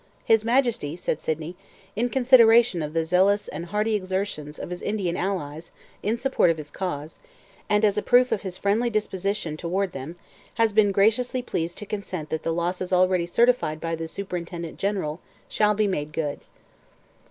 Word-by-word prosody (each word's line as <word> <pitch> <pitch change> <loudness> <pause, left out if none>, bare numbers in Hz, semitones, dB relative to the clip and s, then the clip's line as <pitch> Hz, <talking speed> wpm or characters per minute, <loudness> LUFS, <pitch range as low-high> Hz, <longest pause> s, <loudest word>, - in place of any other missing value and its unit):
'His 225 -1 +4
Majesty,' 235 - +1
said 165 -3 -3
Sydney, 160 +2 -3 0.4
'in 240 +3 0
consideration 235 -6 +5
of 150 0 -4
the 165 -1 0
zealous 190 +4 +3
and 165 +4 -6
hearty 210 +3 0
exertions 185 -6 -3
of - - -7
his 180 - -5
Indian 195 -5 -1
allies 170 -5 -3 0.3
in 215 +3 0
the - - -10
support 265 -9 +3
of 165 - +1
his 150 -1 -8
cause, 155 -5 -5 0.5
and 210 +1 +3
as 210 0 +2
a - - -3
proof 250 +3 +4
of - - 0
his 190 -2 -5
friendly 215 +4 +1
disposition 200 -6 -2
toward 185 +3 -1
them, 135 +4 -7 0.4
has 225 -2 +2
been 205 -1 +4
graciously 225 +6 +2
pleased 170 -7 -3
to 210 - -6
consent 190 -6 -5
that 160 - -1
the 165 - -1
losses 180 +2 -2
already 185 -1 +3
certified 230 -6 +2
by 165 +1 -3
the 165 0 -3
Superintendent 170 -2 -6
General 190 -6 -2 0.3
shall 210 -1 +2
be 215 +1 +2
made 150 -6 -2
good.' 150 -3 -2
190 Hz, 175 wpm, -25 LUFS, 165-215 Hz, 0.5 s, consideration